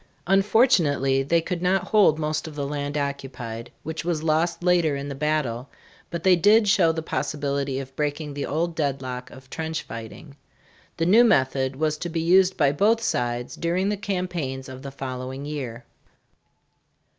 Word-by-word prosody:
Unfortunately 185 - +3
they 165 +5 +2
could 175 +1 -4
not 185 +1 +2
hold 205 -8 +5
most 155 +1 -2
of 155 - -9
the 145 -1 -2
land 145 0 -3
occupied, 135 -5 -5
which 160 +1 -5
was 165 -2 -1
lost 165 +2 +1
later 175 -4 +3
in 140 +1 -5
the - - -4
battle, 140 -4 -1 0.4
but 170 -1 -5
they 185 -1 +6
did 210 +5 +5
show 185 -5 +4
the 160 0 -4
possibility 140 -3 -2
of 135 -1 -8
breaking 150 0 -2
the 140 0 -4
old 165 +4 -1
deadlock 130 -5 -3
of 130 +1 -14
trench 160 +3 -4
righting. 115 +6 -9 0.6
The 165 - 0
new 215 +7 +6
method 130 - +2
was 155 +1 -1
to 175 - -4
be 165 0 -2
used 185 +3 +4
by 145 -4 +4
both 210 +10 +3
sides 120 - -2
during 180 +4 0
the 210 - 0
campaigns 180 -9 -3
of 130 0 -9
the 140 - -6
following 130 0 -6
year. 130 -5 -5
150 Hz, 170 wpm, -24 LUFS, 135-175 Hz, 0.6 s, they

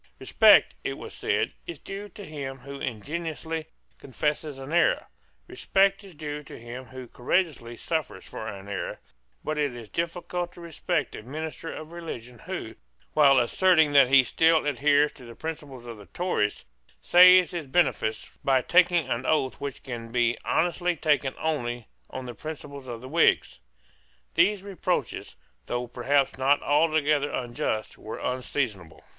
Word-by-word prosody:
Respect, - - +6
it - - -2
was - - -9
said, - - 0
is 345 - -6
due 200 +1 -8
to 205 +1 -10
him 140 -4 -6
who 140 +2 -9
ingenuously 160 +6 -4 0.3
confesses 150 +2 -2
an 135 +3 -7
error; 175 - +3 0.4
respect 195 +1 +2
is 190 -4 -13
due 150 0 -5
to 145 - -11
him 120 +2 -8
who 130 -1 -10
courageously 120 -3 -1
suffers 160 -3 -3
for 110 - -7
an 100 -1 -7
error; 100 -1 -4 0.4
but 155 0 -2
it 145 -4 0
is 115 -3 -9
difficult 175 - -3
to - - -14
respect 170 +1 -2
a - - -7
minister 155 +6 -6
of 155 +1 -8
religion 125 -9 -8
who, - - -5 0.4
while 140 -3 +6
asserting 160 +5 +4
that 140 -2 +7
he 135 -1 +7
still 160 +4 +3
adheres 145 +1 +3
to 130 - -15
the 120 -1 -11
principles 145 -6 -7
of 115 -2 -8
the 100 - -13
Tories, 105 - -1 0.4
saves 180 0 +7
his 170 -5 -5
benefice 130 -7 +1 0.2
by 130 -2 +3
taking 175 -4 +4
an 120 -1 -2
oath 140 -4 +1
which 140 -2 -5
can 115 -3 -7
be 120 0 +2
honestly 175 +1 +1
taken 145 -4 +1
only 120 -7 -2 0.2
on 130 -1 -6
the 120 - -6
principles 140 -1 -8
of 120 -2 -6
the 130 - -8
Whigs. 165 +3 +2 0.7
These 205 -2 +3
reproaches, 200 -2 -3 0.3
though 120 0 -2
perhaps 130 +3 0
not 140 +2 +4
altogether 150 -1 +2
unjust, 120 -4 -3
were - - -7
unseasonable. 125 - -3
145 Hz, 155 wpm, -26 LUFS, 125-165 Hz, 0.7 s, that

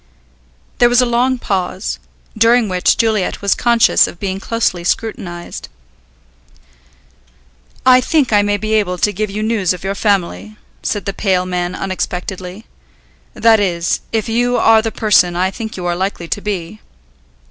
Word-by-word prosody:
There 240 - +5
was 245 0 +3
a 250 - +4
long 250 +2 +1
pause, 190 -3 -3 0.4
during 230 +1 +4
which 185 -2 +1
Juliet 220 -4 0
was 200 - +3
conscious 235 -1 +3
of 170 - -10
being 195 -1 -3
closely 200 -5 -1
scrutinized. 175 -3 -4 2.2
"I 255 0 +6
think 280 -5 +1
I 205 - +5
may 205 0 0
be 215 +1 -3
able 200 -4 +1
to 205 +4 +1
give 215 +2 -2
you 210 +2 -4
news 215 -5 +1
of 180 - -9
your 195 +1 -2
family," 205 +1 -1 0.2
said 205 -2 -3
the 200 - -3
pale 185 -3 0
man 180 0 -2
unexpectedly. 185 +1 -5 0.7
"That 225 -1 +4
is, 175 -4 0
if 220 -2 -1
you 245 +2 +1
are 225 -1 +5
the 225 0 -3
person 185 -6 +3
I 185 +2 0
think 220 +1 -7
you 180 - -5
are 175 0 0
likely 185 -2 -3
to 205 - -2
be." 200 -1 -5
205 Hz, 160 wpm, -16 LUFS, 185-225 Hz, 2.2 s, I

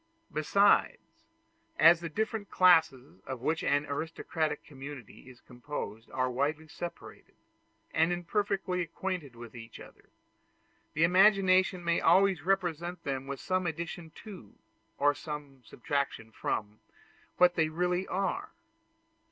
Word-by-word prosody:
Besides, 200 +7 +2 0.5
as 165 +2 +7
the 170 -1 -5
different 220 +3 -3
classes 160 - +3
of 130 -3 -5
which 160 +5 -1
an 145 +1 +2
aristocratic 155 +1 -3
community 135 -2 -10
is 125 -1 -16
composed 120 -4 -7
are 130 -1 -1
widely 150 +5 -1
separated, 170 +3 -9 0.6
and 160 +2 +2
imperfectly 185 +1 -1
acquainted 170 -5 -4
with 120 0 -11
each 115 -1 -10
other, - - -15 0.9
the 155 - +2
imagination 185 0 +4
may 170 0 +1
always 185 0 +4
represent 175 -1 -1
them 135 -1 -3
with 140 -1 -5
some 185 -1 -1
addition 165 +1 -5
to, 190 - -11 0.4
or 145 +1 +3
some 145 -3 -8
subtraction 135 -3 -3
from, 105 -1 -3 0.6
what 180 0 +5
they 160 -2 +1
really 180 +3 -1
are. 195 0 -2
160 Hz, 120 wpm, -30 LUFS, 140-180 Hz, 0.9 s, as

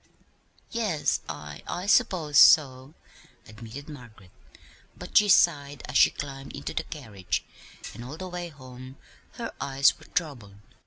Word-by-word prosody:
"Yes, 210 -10 -1
I 75 -1 -8
I 180 - -4
suppose 165 -7 +3
so," 135 0 +5 0.5
admitted 115 +6 -10
Margaret; 115 - -13 0.7
but - - -11
she 210 0 +6
sighed 145 -7 +3
as 125 - -8
she - - +7
climbed 135 -1 -8
into - - -6
the - - -1
carriage, 100 -4 -5 0.5
and 120 - -9
all 135 +6 -8
the 185 - -6
way 175 -1 -6
home 130 -2 -12 0.4
her - - -6
eyes 140 +1 +2
were 160 - -16
troubled. 125 - -4
140 Hz, 140 wpm, -26 LUFS, 125-160 Hz, 0.7 s, she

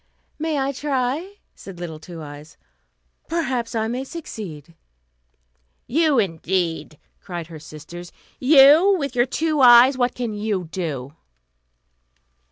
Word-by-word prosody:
"May 315 -1 -1
I 270 0 0
try?" 280 +7 -2 0.2
said 190 -3 -12
little 165 -3 -6
Two 165 -1 -10
Eyes; 145 +2 -11 0.7
"perhaps 265 -9 -2
I 220 0 0
may 245 +3 -3
succeed." 195 - -8 1.1
"You, 305 +1 +2
indeed!" 170 -4 -1 0.2
cried 175 -3 -6
her 160 -1 -11
sisters; 155 +3 -11 0.3
"you, 295 +8 +7
with 280 -5 -3
your 240 +1 +3
two 315 -1 0
eyes, 250 +2 +7
what 245 0 +1
can 240 -3 -3
you 205 -3 -2
do?" 145 -7 -4
230 Hz, 120 wpm, -22 LUFS, 170-275 Hz, 1.1 s, you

